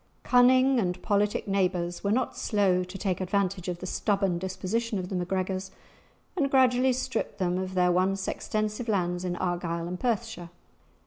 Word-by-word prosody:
Cunning 255 +1 +5
and 180 -3 -1
politic 205 0 +1
neighbours 180 -3 0
were 200 - 0
not 250 +4 0
slow 190 -4 +1
to 180 +2 -8
take 190 -2 -2
advantage 190 -1 -1
of 175 -1 -2
the 185 - -7
stubborn 195 -2 0
disposition 205 +5 -2
of 185 -1 -4
the 190 - -3
MacGregors, 185 +1 -2 0.7
and 285 -6 +1
gradually 260 -1 +4
stripped 260 +1 -2
them 180 -1 0
of 185 0 -4
their 180 -1 +3
once 190 +2 +1
extensive 215 +2 -2
lands 180 -4 0
in 180 -1 -2
Argyle 175 -1 -2
and 180 +1 -5
Perthshire. 225 -7 -2
190 Hz, 165 wpm, -27 LUFS, 180-220 Hz, 0.7 s, Cunning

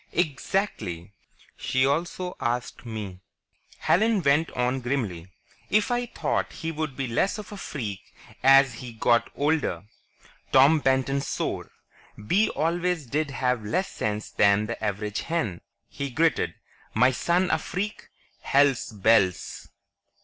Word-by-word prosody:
"Exactly. 125 - -2 0.4
She 130 0 +1
also 175 +5 -1
asked 120 +1 -3
me," 105 -5 -6 0.6
Helen 215 0 +2
went 145 +3 +3
on 125 +1 0
grimly, 115 -10 -2 0.4
"if 215 +3 +2
I 245 0 0
thought - - -2
he'd 160 -4 -4
be 135 - -1
less 125 - 0
of 210 -1 -9
a - - -6
freak 110 - -5 0.4
as 135 -1 +6
he 120 +1 -8
got 115 +1 +2
older." 145 - 0 0.7
Tom 140 +4 +6
Benton 135 0 +1
swore. - - -3 0.6
"Bee 200 - +3
always 170 0 0
did 145 +5 -1
have 125 -4 -1
less 180 - -1
sense 105 0 -3
than 100 +1 +3
the 115 0 -6
average 105 0 -2
hen," 115 - -2 0.3
he 140 -1 -5
gritted. 160 +6 +1 0.4
"My 125 +4 +5
son 175 +8 +1
a 160 - +2
freak! 200 +6 -4 0.3
Hell's 140 -2 +3
bells!" 100 -3 +2
135 Hz, 125 wpm, -26 LUFS, 110-165 Hz, 0.7 s, as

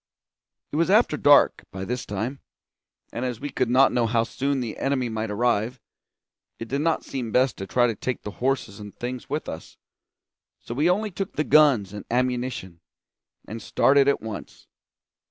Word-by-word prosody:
It 150 - -2
was 165 +2 +2
after 210 -5 +4
dark 145 -1 +5
by 95 0 -5
this 125 +4 -4
time, 115 +7 -3 0.7
and 120 - -3
as 125 -3 -3
we 145 +2 -5
could 130 -3 0
not 130 +2 +5
know 120 -2 +1
how 115 0 +2
soon 135 +3 -2
the 120 -3 -4
enemy 135 -3 0
might 110 0 -3
arrive, 120 +2 0 0.8
it 115 - -7
did 140 +4 -1
not 165 +1 0
seem 125 -4 -4
best 125 0 +2
to 95 - -6
try 120 +3 +3
to 120 - +1
take 125 +3 -4
the 105 - -5
horses 130 -6 -1
and 105 -1 -10
things 125 +2 -5
with 150 +3 -3
us; 80 - -8 0.8
so - - -7
we 150 +7 +2
only 210 +3 0
took 195 +2 -4
the 150 - +1
guns 135 -12 +4
and 105 - -7
ammunition, 120 -8 -2 0.7
and 115 +1 -7
started 140 +5 +3
at 140 - +2
once. 110 -3 -8
125 Hz, 180 wpm, -24 LUFS, 110-140 Hz, 0.8 s, dark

